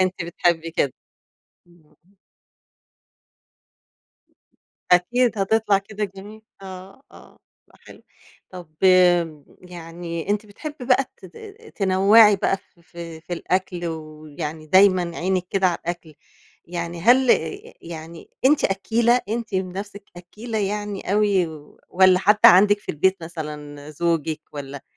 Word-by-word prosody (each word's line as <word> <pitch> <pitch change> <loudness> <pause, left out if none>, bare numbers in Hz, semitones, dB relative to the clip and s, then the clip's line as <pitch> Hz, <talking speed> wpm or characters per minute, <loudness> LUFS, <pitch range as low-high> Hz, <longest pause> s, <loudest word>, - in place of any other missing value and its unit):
أنتِ 185 -2 -1
بتحبي 170 -1 -1
كده. 140 -5 0 0.7
امم، 175 -2 -24
آه. - - -30 3.0
أكيد، 235 +6 +2
هتطلع 205 0 +2
كده 210 +1 -5
جميلة، 205 +3 -11 0.2
آه، 190 +4 -11
آه - - -17 0.3
بقى - - -24
حلو، - - -16 0.5
طب 180 -3 -10 0.2
آآ، 175 -5 +4 0.2
يعني 170 -1 -8
أنتِ 210 +1 -1
بتحبي 290 +6 -9
بقى 260 +1 +3
ت - - -13
ت 180 - -19 0.4
تنوعي 200 +2 +5
بقى 195 - 0
في 175 - -28
في 165 -1 -10
في 175 - -10
الأكل 175 0 -2
ويعني 155 -1 -7
دايمًا 185 0 +4
عينِك 185 0 -1
كده 195 -1 +2
على 175 - 0
الأكل 170 -2 -6 0.5
يعني 170 0 -5
هل 245 +6 +4
ي 430 +4 -1
يعني 165 0 -10
أنتِ 285 +3 +4
أكّيلة 230 +5 +1
أنتِ 225 -2 -4
بنفسِك 195 +2 -4
أكّيلة 215 +6 -6
يعني 205 -1 -3
أوي، 205 -4 +2 0.4
والَّا 185 0 +4
حد 210 +2 +3
عندِك 205 +3 +7
في 205 - -25
البيت 190 +6 +1
مثلًا 150 -3 -8
زوجِك 160 -1 -1
والَّا 140 -1 -8
185 Hz, 125 wpm, -22 LUFS, 170-205 Hz, 3.0 s, عندِك